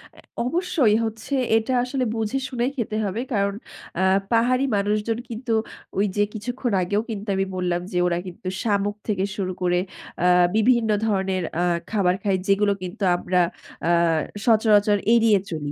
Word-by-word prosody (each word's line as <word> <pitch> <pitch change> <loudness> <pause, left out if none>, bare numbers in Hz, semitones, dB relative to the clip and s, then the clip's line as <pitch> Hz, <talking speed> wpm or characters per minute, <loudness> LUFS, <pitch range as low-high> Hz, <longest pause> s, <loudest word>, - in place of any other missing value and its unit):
অ্যা - - -16 0.2
অবশ্যই 280 - +2
হচ্ছে 225 +5 -5 0.2
এটা 225 +4 -1
আসলে 255 0 -1
বুঝে 225 +4 -1
শুনেই 250 +1 -1
খেতে 215 -2 -2
হবে। 205 +4 -2
কারণ 200 -1 +1 0.5
আ - - +1 0.3
পাহাড়ি 250 +3 +3
মানুষজন 210 +3 0
কিন্তু 230 0 -3 0.5
ওই 205 - +3
যে 205 - +4
কিছুক্ষণ 245 +2 -3
আগেও 205 +4 0
কিন্তু 210 -1 -5
আমি 195 0 +1
বললাম 180 -1 -1
যে - - -2
ওরা 170 -1 0
কিন্তু 180 +1 -9
শামুক 205 -1 0
থেকে 195 -3 0
শুরু 185 -2 -2
করে 180 0 +2 0.4
অ্যা 180 - +2 0.3
বিভিন্ন 230 +1 +3 0.2
ধরনের 190 -3 0
অ্যা 175 +2 +1 0.3
খাবার 185 -4 +2
খায় 195 -2 +2
যেগুলো 200 +1 +3
কিন্তু 200 +4 -6
আমরা 180 0 +1 0.5
আ - - +2 0.6
সচরাচর 215 -2 +4 0.2
এড়িয়ে 225 -3 +5
চলি। 145 -2 -4
210 Hz, 155 wpm, -23 LUFS, 190-230 Hz, 0.6 s, এড়িয়ে